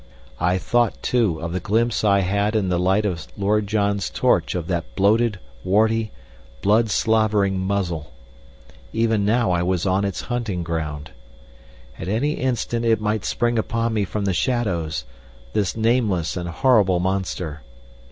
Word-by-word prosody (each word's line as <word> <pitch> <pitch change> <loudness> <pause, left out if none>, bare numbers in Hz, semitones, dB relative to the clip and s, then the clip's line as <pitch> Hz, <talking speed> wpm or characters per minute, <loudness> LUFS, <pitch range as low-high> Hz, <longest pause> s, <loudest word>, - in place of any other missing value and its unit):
I 90 +2 +2
thought, 120 +4 0
too, 110 -10 +1
of 85 0 -3
the 95 - -1
glimpse 115 +4 0
I 100 -2 +4
had 100 +3 0
in 100 -4 +1
the 90 -1 +1
light 95 +4 +2
of 85 -5 -3
Lord 105 +1 +1
John's 100 -2 0
torch - - +1
of 90 -3 -2
that 85 -1 -3
bloated, 105 +2 +3 0.3
warty, 110 +3 +2 0.5
blood 110 +2 +3
slavering 105 -3 +2
muzzle. 90 -7 -2 0.8
Even 110 -2 +1
now 115 -1 +2
I 85 -1 +1
was 90 0 0
on 95 +1 +1
its 100 -2 -2
hunting 115 -8 -3
ground. 75 -3 -4 0.9
At 80 - -5
any 115 +9 0
instant 120 -3 -1
it 115 -1 +3
might 105 0 -1
spring 120 -1 0
upon 115 +1 -1
me 105 -2 +1
from 100 +1 -3
the 95 - +1
shadows 85 - -1 0.5
this 100 0 0
nameless 110 -8 +1
and 90 -1 -4
horrible 100 -2 +3
monster. 90 -5 -2
100 Hz, 150 wpm, -22 LUFS, 90-110 Hz, 0.9 s, I